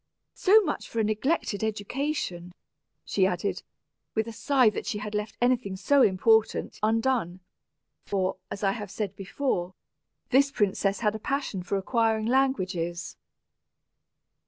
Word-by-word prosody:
So 420 +3 +5
much 310 -7 -3
for 230 - -3
a - - +3
neglected 215 0 0
education," 215 - -3 0.5
she 190 -2 +2
added, 180 +2 -2 0.5
with 220 +1 0
a - - -5
sigh 260 +1 +3
that - - -5
she 210 - -1
had 210 0 -6
left 210 +1 -3
anything 245 -5 +1
so 280 +8 +3
important 220 +2 +3
undone; 225 -4 +1 0.7
for, 190 -2 0
as 200 - -6
I 195 - +3
have 205 -1 -5
said 200 -1 -4
before, 190 -3 -2 0.6
this 275 +2 +5
princess 200 -2 0
had 210 -2 +2
a 220 - -5
passion 270 -6 -2
for 180 +3 -2
acquiring 220 +1 +1
languages. 185 -10 0
215 Hz, 135 wpm, -27 LUFS, 195-250 Hz, 0.7 s, So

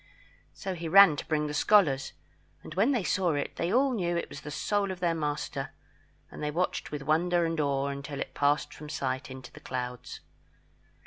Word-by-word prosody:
So 190 - -4
he 170 -2 -5
ran 190 -2 +8
to - - -6
bring 150 -1 +1
the 150 - -3
scholars; 145 -5 +3 0.5
and - - -9
when 205 - +3
they 240 -7 +1
saw 180 -3 +1
it, 145 - -3
they 170 +2 -1
all 260 +3 +3
knew 175 -6 0
it - - -3
was 145 - -9
the 150 - -7
soul 200 +6 0
of 185 -1 -5
their 175 -2 +1
master; 145 -3 -3 0.6
and - - -9
they 150 - -1
watched 175 +5 -1
with 145 -2 -4
wonder 170 +4 +2
and 165 -1 -2
awe 140 -2 +1
until 140 0 -5
it - - -4
passed 145 +1 +1
from 150 0 -10
sight 130 -3 -3
into 130 -1 -9
the - - -13
clouds. 125 -1 -5
155 Hz, 200 wpm, -29 LUFS, 140-180 Hz, 0.6 s, ran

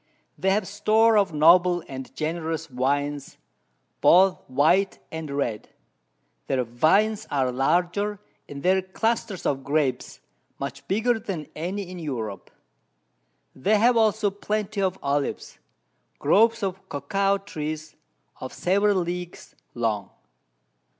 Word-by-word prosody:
They 190 - 0
have 195 0 +1
Store 220 +2 +3
of 200 -4 +3
noble 175 +3 +5
and 130 -1 -8
generous 160 0 -3
Wines, 140 +2 -2 0.6
both 185 +1 +5
white 160 +9 +2
and 160 -1 -6
red; 130 -7 -3 0.8
their 130 - +1
Vines 175 - +2
are 130 -3 0
larger, 175 +10 0 0.3
and 140 -1 -8
their 190 +1 +3
Clusters 200 +1 -2
of 135 -1 0
Grapes 140 -3 -1 0.4
much 140 0 -6
bigger 225 +4 +1
than 180 -8 -6
any 185 +6 -3
in 180 0 -8
Europe. 115 - -5 1.1
They 205 +11 +2
have 235 +3 +4
also 220 -2 +2
plenty 210 0 -3
of 190 -1 0
Olives, 140 0 -2 0.6
Groves 225 +8 +3
of 190 0 -4
Cocoa 195 +8 0
Trees 155 -5 -6 0.4
of 130 - -7
several 200 +1 +2
Leagues 175 0 -6 0.2
long. 110 -4 -1
175 Hz, 115 wpm, -25 LUFS, 140-200 Hz, 1.1 s, noble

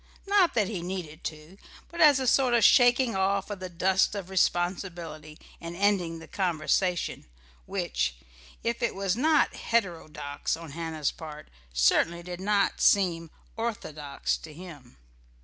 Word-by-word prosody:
Not 395 -3 +3
that 210 -4 +2
he 195 -4 -4
needed 175 -3 -6
to: 155 +5 -7 0.3
but 340 - -4
as 290 -3 +7
a 260 - -1
sort 255 0 +3
of 235 - +3
shaking 245 -2 +5
off 195 +1 0
of 200 - -5
the 185 -1 -6
dust 185 +3 +1
of 190 -2 -6
responsibility 175 -4 -1 0.2
and 170 0 -6
ending 185 -4 +1
the 160 - -11
conversation, 180 - -1 0.4
which, - - -1 0.5
if 235 0 -2
it 235 - 0
was 195 -1 0
not 305 +6 +3
heterodox 165 -11 -2
on 165 -3 -10
Hannah's 160 -1 -2
part, 155 -2 -10 0.2
certainly 165 - +2
did 180 +1 -7
not 200 0 +1
seem 170 -5 +3 0.3
orthodox 155 -11 -3
to 160 - -11
him.... 155 - -12
180 Hz, 145 wpm, -27 LUFS, 160-205 Hz, 0.5 s, as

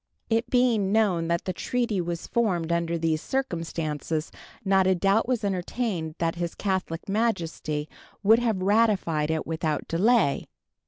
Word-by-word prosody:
It 225 +2 +1
being 235 -6 +2
known 195 -6 +2
that 170 0 -1
the 185 - -2
treaty 230 -1 -1
was 170 0 -4
formed 180 -8 0
under 170 0 0
these 160 -1 0
circumstances, 165 - -3 0.3
not 190 -1 +4
a 190 - +4
doubt 195 +5 +2
was 245 -3 0
entertained 185 -3 -2
that 165 -1 0
His 170 -1 -4
Catholic 190 -3 -2
Majesty 170 -8 -1 0.4
would 220 +3 +6
have 220 -6 0
ratified 195 -7 +2
it 160 -1 -1
without 160 -2 -2
delay. 185 - +2
185 Hz, 145 wpm, -26 LUFS, 165-220 Hz, 0.4 s, would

